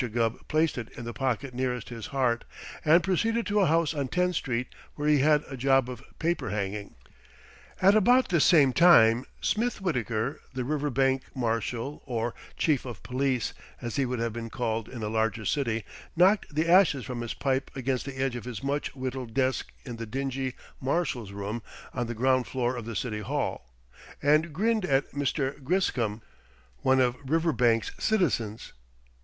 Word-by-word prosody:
Gubb 115 0 -1
placed 155 -3 +1
it 115 - -6
in 120 - -6
the 120 - -5
pocket 130 0 -2
nearest 125 -2 -2
his 115 -3 -6
heart 125 -4 0 0.4
and 165 +2 +5
proceeded 225 +5 +1
to 210 0 +1
a 190 - +4
house 165 0 +2
on 140 -3 -2
Tenth 180 +5 0
Street 125 -4 -1 0.3
where 150 0 -2
he 150 -1 +5
had 150 +1 +4
a 135 - -6
job 135 0 +3
of 125 +1 -9
paper 170 -7 -1
hanging. 100 0 -4 0.8
At 195 +2 +6
about 245 +5 +4
this 170 -5 +3
same 145 -7 +5
time 125 -8 +6 0.2
Smith 230 +2 0
Wittaker, 125 - -1 0.2
the 130 - -1
Riverbank 135 -1 +1
Marshal 120 +3 -2
or 120 -2 -2 0.2
Chief 150 -5 +2
of 120 -6 -8
Police, 130 -2 -1 0.3
as 120 +2 -4
he 135 -2 +2
would 125 0 -2
have 115 -1 -2
been 115 0 -5
called 115 -2 -2
in 120 -4 -7
a - - -1
larger 110 0 0
city 115 -6 0 0.3
knocked 185 -2 +3
the 160 +2 +1
ashes 170 - +5
from 120 0 -4
his 120 - -4
pipe 135 -1 0
against 130 -1 -1
the 135 -1 -6
edge 135 -1 0
of 120 - -6
his 125 +1 -6
much 140 +1 -2
whittled 130 -3 -5
desk 130 -1 0
in 120 -3 -6
the 115 -1 -6
dingy 135 +1 -3 0.2
Marshal's 130 - -1
room 100 +3 -4 0.3
on 120 -2 -2
the 120 - -4
ground 130 +2 +2
floor 125 -1 -1
of 120 -3 -6
the 115 -1 -5
City 105 +1 -2
Hall, 115 - -3 0.5
and 155 +3 +3
grinned 215 +6 +1
at 135 -5 +1
Mr. 140 0 -2
Griscom, 120 - 0 0.5
one 130 - +3
of 125 -1 +3
Riverbank's 135 -6 +2
citizens. 125 - 0
130 Hz, 175 wpm, -28 LUFS, 120-150 Hz, 0.8 s, At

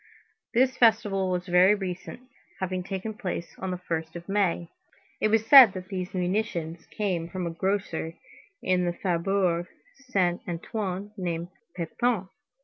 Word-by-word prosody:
This 260 +1 +4
festival 205 -5 +3
was 180 -1 -1
very 180 +3 +5
recent, 190 +3 -6 0.4
having 185 -1 -2
taken 195 +3 -4
place 185 -4 -5
on 190 - -3
the 180 - -2
1st 165 -2 -4
of 170 0 -8
May. 195 -4 +1 0.5
It - - +3
was 220 0 +2
said 250 -4 +10
that 185 0 -7
these 185 -1 -4
munitions 180 -3 -2
came 180 -6 -2
from 185 0 -4
a 170 - -2
grocer 170 -2 -2 0.5
in 180 -1 +2
the 175 - 0
Faubourg 175 -1 0 0.3
Saint 190 - -1
Antoine 190 +3 -4
named 175 -2 -3 0.3
Pépin. 190 +3 -1
185 Hz, 140 wpm, -27 LUFS, 175-205 Hz, 0.5 s, said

